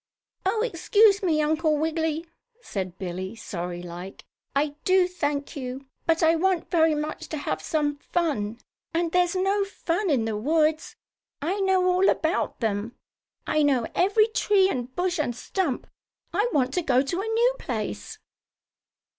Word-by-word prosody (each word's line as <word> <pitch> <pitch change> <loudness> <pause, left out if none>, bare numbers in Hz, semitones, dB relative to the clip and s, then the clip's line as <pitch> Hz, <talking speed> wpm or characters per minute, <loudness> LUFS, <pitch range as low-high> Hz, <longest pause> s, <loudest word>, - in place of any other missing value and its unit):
"Oh, 435 +3 +1
excuse 410 0 +4
me, 315 -5 +2
Uncle 310 0 +2
Wiggily," 320 +1 -1 0.3
said 185 - -5
Billie, 185 +3 -5
sorrylike. 175 -2 -6 0.3
"I 290 +2 +2
do 370 -1 +4
thank 290 -5 -3
you. 260 0 -5 0.2
But 330 +1 +3
I 325 +1 +5
want 365 0 0
very 320 -2 +4
much 300 +1 -4
to 310 - -3
have 285 - -3
some 295 -3 0
fun, 280 -10 -1 0.4
and 335 -1 +1
there's 360 +1 +2
no 390 +2 +2
fun 390 -1 -2
in 255 -7 +2
the 220 -1 -2
woods. 310 +7 +1 0.4
I 355 +8 -1
know 380 -1 +3
all 365 +1 +4
about 320 -4 0
them. 220 +1 -1 0.5
I 305 - +1
know 270 -5 +3
every 405 +4 +4
tree 410 -3 +3
and 245 -1 -3
bush 360 -1 0
and 245 -6 -1
stump. 330 - -2 0.5
I 415 +7 +2
want 260 -4 +1
to 360 - +1
go 260 -5 +3
to 340 +7 -2
a 430 - -4
new 470 +3 +2
place." 210 - -4
315 Hz, 155 wpm, -26 LUFS, 255-365 Hz, 0.5 s, I